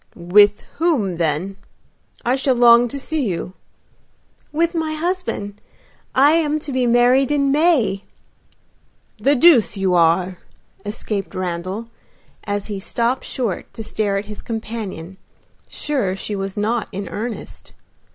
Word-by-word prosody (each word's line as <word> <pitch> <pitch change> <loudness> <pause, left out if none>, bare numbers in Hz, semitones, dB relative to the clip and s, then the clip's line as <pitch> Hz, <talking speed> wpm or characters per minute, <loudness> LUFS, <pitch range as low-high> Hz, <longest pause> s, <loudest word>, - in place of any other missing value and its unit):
"With 205 +4 +4 0.2
whom 250 - +1
then? 170 +4 -1 0.7
I 245 +2 +2
shall 270 -1 +1
long 240 0 +6
to 280 +4 -6
see 310 +1 -2
you." 180 0 -4 1.0
"With 335 +3 +1
my 320 -2 -2
husband. 310 - -3 0.5
I 280 +3 +6
am 310 -2 +2
to 290 - -6
be 255 -2 +1
married 245 +3 +4
in 280 -2 +2
May." 285 - +2 1.1
"The 280 +1 +3
deuce 255 -8 +5
you 190 -2 +1
are!" 175 +2 +2 0.4
escaped 205 -2 -4
Randal, 185 +4 -4 0.6
as 205 0 -2
he 205 -2 -5
stopped 235 +5 -1
short 230 -8 -4
to 225 - -6
stare 205 -2 -1
at 200 - -3
his 210 0 -9
companion, 215 -6 -6 0.5
sure 255 -11 -1
she 205 +1 -4
was 195 0 -4
not 220 +2 0
in 200 0 -5
earnest. 225 +2 -6
220 Hz, 130 wpm, -20 LUFS, 195-275 Hz, 1.1 s, long